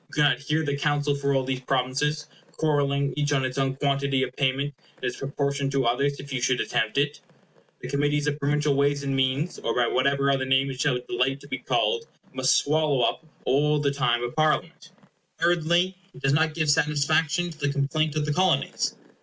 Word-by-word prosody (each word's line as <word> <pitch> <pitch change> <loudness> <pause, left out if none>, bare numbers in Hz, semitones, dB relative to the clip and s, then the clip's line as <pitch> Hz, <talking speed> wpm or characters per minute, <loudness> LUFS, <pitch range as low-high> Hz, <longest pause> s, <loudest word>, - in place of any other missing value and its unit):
You - - -22
cannot 145 -4 +3
hear 150 +3 -1
the 145 -1 -1
counsel 145 0 0
for 140 0 0
all 135 - +2
these 130 0 -2
provinces, 135 +4 -1 0.3
quarrelling 140 -2 0
each 145 0 0
on 135 -2 +1
its 130 +1 -3
own 135 0 0
quantity 140 -1 0
of 130 -1 -5
payment, 140 +1 0 0.2
and - - -8
its 125 - -2
proportion 140 0 -2
to 135 -2 0
others 140 +4 +1
If 140 0 -8
you 130 - -2
should 130 -1 +1
attempt 110 +4 -1
it, 145 +1 0 0.6
the - - -6
Committee 145 +1 +1
of 145 0 -1
Provincial 145 0 +1
Ways 140 0 +1
and 135 -1 -1
Means, 135 +5 0
or - - -2
by 125 - +3
whatever 140 +3 +2
other 135 -1 +1
name 135 +1 +2
it 130 -1 -3
will 130 -4 +1
delight 130 +3 0
to - - -13
be - - -4
called, 465 -1 0 0.3
must - - +3
swallow 150 -3 +1
up 120 - 0 0.2
all 150 +3 +2
the 145 -1 +1
time 120 -4 +1
of 120 - -4
Parliament. 155 0 0 0.5
Thirdly, 175 +2 +2 0.2
it - - -13
does 135 0 +3
not 155 +1 +2
give 155 -3 +2
satisfaction 155 +3 +1
to 160 - -14
the 145 -1 0
complaint 150 +2 0
of 150 -1 0
the 150 - 0
Colonies. 185 +1 +1
140 Hz, 205 wpm, -25 LUFS, 135-150 Hz, 0.6 s, cannot